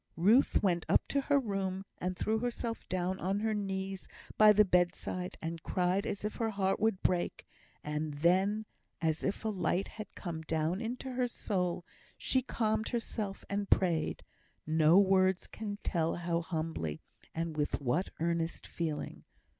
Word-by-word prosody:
Ruth 215 +11 +4
went 175 -4 +2
up - - +3
to 280 - +2
her 285 +1 +3
room, 195 -5 -2
and 180 0 -2
threw 220 +1 +1
herself 235 -1 -3
down 185 +1 -1
on 195 +3 0
her 220 0 +1
knees 195 -2 -3 0.3
by 215 0 +8
the 210 0 +6
bedside, 180 0 0
and 165 0 -4
cried 180 +4 0
as 200 - -3
if 210 - -3
her 225 -1 0
heart 195 -2 0
would 220 -3 +1
break; 180 -1 0 0.4
and 150 0 -3
then, 190 +7 +2 0.3
as 160 -1 0
if 195 +3 -2
a - - +2
light 185 -1 0
had 215 -3 -9
come 170 -4 -5
down 160 +4 -1
into 250 +3 -4
her 250 0 0
soul, 180 -7 -2 0.3
she 260 - +1
calmed 220 -3 0
herself 220 -4 -3
and 200 0 -2
prayed 170 -4 +2 0.4
no 160 +2 +5
words 190 -1 +4
can 205 -2 -5
tell 165 -2 0
how 170 -1 -1
humbly, 160 - -3 0.4
and 165 -1 -2
with 150 -1 0
what 140 +7 0
earnest 170 0 -1
feeling. 160 -3 -4
190 Hz, 160 wpm, -32 LUFS, 170-210 Hz, 0.4 s, by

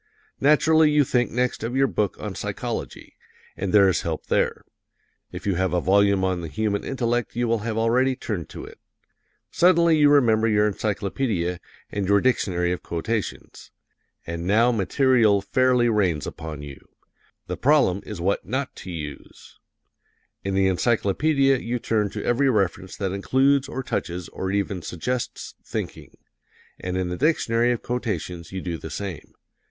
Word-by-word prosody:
Naturally 155 +2 +4
you 150 -1 +4
think 125 -2 +1
next 125 -1 -1
of 120 +3 -3
your 135 +1 +4
book 105 -6 -1
on - - -5
psychology, - - -5 0.4
and 95 -1 -3
there 100 -2 +6
is 95 - +1
help 80 -2 -4
there. - - 0 0.7
If - - -8
you 100 - +1
have 95 -1 0
a 90 - +2
volume 100 +1 +3
on 95 -2 -1
the 85 - -5
human 105 +4 -2
intellect 120 -3 -2
you 120 0 0
will 115 0 +1
have 110 +1 -3
already 125 +4 +2
turned 100 - -5
to - - -8
it. - - -13 0.7
Suddenly 170 -2 +4
you 145 -1 +6
remember 115 -6 +4
your 105 -1 +3
encyclopedia 100 -3 -2 0.3
and 100 -2 -2
your 100 +1 +4
dictionary 90 -8 +1
of 90 - -3
quotations 100 +6 -4 0.6
and 85 +1 -5
now 115 +5 +4
material 115 -1 +3
fairly 130 +2 +2
rains 95 -9 +1
upon 75 -2 -7
you; 70 -2 -9 0.7
the - - -4
problem 130 -10 +3
is 105 -4 -7
what 95 +4 0
not 130 +4 -3
to - - -9
use. 75 -4 -9 0.8
In 95 0 -2
the 95 0 +3
encyclopedia 125 - +2
you 120 +1 -2
turn 110 -3 0
to - - -6
every 135 +3 +2
reference 100 -3 -1
that 95 -2 -2
includes 135 +8 +2
or 130 - -4
touches 90 -7 -4
or 95 - -4
even 100 -2 -1
suggests 120 +10 -4
"thinking;" - - -6 0.6
and 90 0 -3
in 90 -1 -1
the 90 - -3
dictionary 120 -6 +2
of 120 - -3
quotations 90 -9 -4
you 95 0 -4
do 85 -3 -4
the - - -8
same. 95 -6 -6
105 Hz, 160 wpm, -24 LUFS, 95-125 Hz, 0.8 s, there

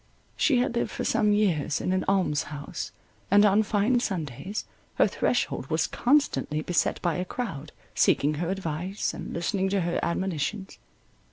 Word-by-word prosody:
She 280 -5 +3
had 245 -1 +1
lived 235 - 0
for - - -4
some 210 - +2
years 180 -8 +1
in 185 - -1
an 185 - +1
alms 185 -7 +1
house, 145 -1 -6 0.4
and 205 +2 +6
on 205 +1 +5
fine 215 +4 +2
Sundays 185 - -4 0.3
her - - +5
threshold - - -1
was - - +1
constantly 245 - +1
beset 180 - +1
by 175 -2 +1
a 180 - -1
crowd, 190 - -5 0.2
seeking 145 +2 +3
her 175 - -1
advice 185 +1 -2
and - - -7
listening 190 +3 -1
to 195 0 +1
her 170 0 -1
admonitions. 190 +3 -2
190 Hz, 160 wpm, -27 LUFS, 165-210 Hz, 0.4 s, and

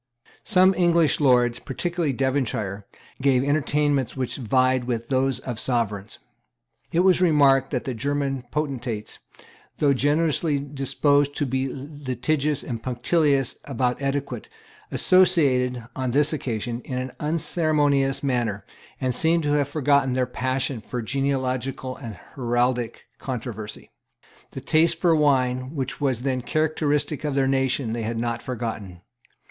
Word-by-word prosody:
Some 185 +1 +4
English 170 -3 +3
lords, 125 -4 +3
particularly 170 +2 -2
Devonshire, 115 -7 -2 0.3
gave 130 -2 +3
entertainments 145 -2 +1
which 130 -2 -2
vied 130 0 +2
with 115 -2 -3
those 135 -1 +1
of 120 -4 -5
Sovereigns. 110 -5 -2 0.7
It 170 - +3
was 185 -1 +4
remarked 140 -6 +4
that 125 -4 -2
the 130 - -3
German 135 +1 -2
potentates, 125 -8 -4 0.6
though 145 -2 +3
generally 150 +2 +1
disposed 140 +1 +1
to 145 - 0
be 130 0 -1
litigious 145 +1 -2
and 115 -3 -5
punctilious 135 +2 +1
about 125 -1 -1
etiquette, 135 -3 -3 0.4
associated, 135 -10 +3
on 130 -1 -2
this 145 +5 +2
occasion, 120 -4 -3
in 125 - -5
an 130 0 -3
unceremonious 150 -3 +1
manner, 120 -7 -1 0.3
and 130 -1 0
seemed 165 +5 +2
to 145 - 0
have 145 -2 +1
forgotten 140 -3 +2
their 130 0 +1
passion 130 0 -2
for 120 +2 -5
genealogical 130 0 -2
and 115 -6 -8 0.2
heraldic 120 -2 -1
controversy. 115 -4 -6 0.6
The 135 - -8
taste 160 +3 +2
for 170 -2 +4
wine, 130 -2 +1
which 135 -1 -4
was 130 -4 0
then 130 -2 0
characteristic 150 +1 0
of 145 -2 -1
their 135 -1 +2
nation, 135 -3 0
they 120 - -3
had 115 +1 -3
not 115 0 -2
forgotten. 110 -7 -5
135 Hz, 130 wpm, -24 LUFS, 125-145 Hz, 0.7 s, Some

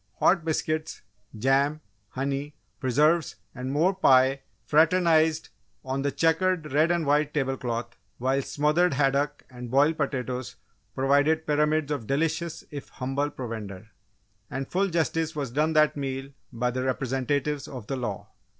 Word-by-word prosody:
Hot 175 -2 +3
biscuits, 155 0 -2 0.3
jam, 135 +6 +2 0.3
honey, 140 +3 -3 0.2
preserves, 150 +5 +2 0.2
and 130 +1 -5
more 165 +7 +2
pie 135 -6 +4 0.2
fraternised 160 0 +3 0.4
on 135 +1 -2
the 140 0 0
checkered 165 +1 +1
red 155 +3 +4
and 170 -2 +1
white 150 +1 +1
table 135 -2 0
cloth, 120 -2 -4 0.2
while 130 +2 +1
smothered 150 +4 +1
haddock 140 +1 +1
and 125 -2 -9
boiled 145 +5 +3
potatoes 130 -3 -3 0.4
provided 145 +4 +2
pyramids 150 0 +1
of 130 -7 -3
delicious 165 +3 -1
if 145 -2 -7
humble 135 +3 -2
provender. 110 -6 -7 0.6
And 135 0 -4
full 195 +2 +1
justice 165 -1 -1
was 140 -5 -3
done 155 +5 +1
that 155 -1 +4
meal 135 -1 -4 0.2
by 125 0 -1
the 130 +1 -3
Representatives 135 +2 -1
of 125 -6 -8
the 135 - -3
Law! 105 -4 -5
140 Hz, 140 wpm, -26 LUFS, 130-155 Hz, 0.6 s, pie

